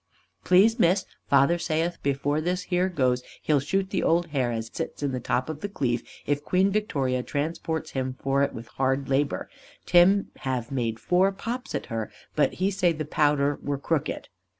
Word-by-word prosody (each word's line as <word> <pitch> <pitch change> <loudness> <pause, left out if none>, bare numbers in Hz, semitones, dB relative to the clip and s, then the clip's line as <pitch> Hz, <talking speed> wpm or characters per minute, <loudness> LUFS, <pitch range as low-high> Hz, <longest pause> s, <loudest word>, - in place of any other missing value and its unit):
Please 210 +6 +5
Miss, 185 0 +3 0.2
father 140 +5 +4
saith 165 +1 -1
before 140 +2 0
this 180 +3 -1
here 180 +1 +2
goes 130 -7 +1 0.2
he'll 150 -2 +3
shoot 190 +7 -1
the 190 - 0
old 170 +1 +2
hare 130 -5 0
as 115 -1 -4
sits - - -5
in 140 - 0
the 130 - -2
top 125 +1 -1
of 155 -1 -6
the 205 - -3
cleeve 125 - -1 0.2
if 145 0 0
Queen 185 +5 +2
Victoria 140 -12 0
transports 160 +3 -3
him 130 -1 -2
for 135 0 +1
it 140 - +2
with 115 - -8
hard 135 +1 +1
labour. 140 +1 0 0.4
Tim 190 +3 +5
have 130 -3 -3
made 115 -4 -1
four 185 - +3
pops 240 +6 -5
at - - -3
her, 110 -2 -3 0.2
but 150 - +2
he 190 +2 0
say 185 -3 +2
the 155 -1 -4
powder 145 -2 +2
were 145 -1 -2
crooked. 145 +1 -2
145 Hz, 185 wpm, -26 LUFS, 135-180 Hz, 0.4 s, Please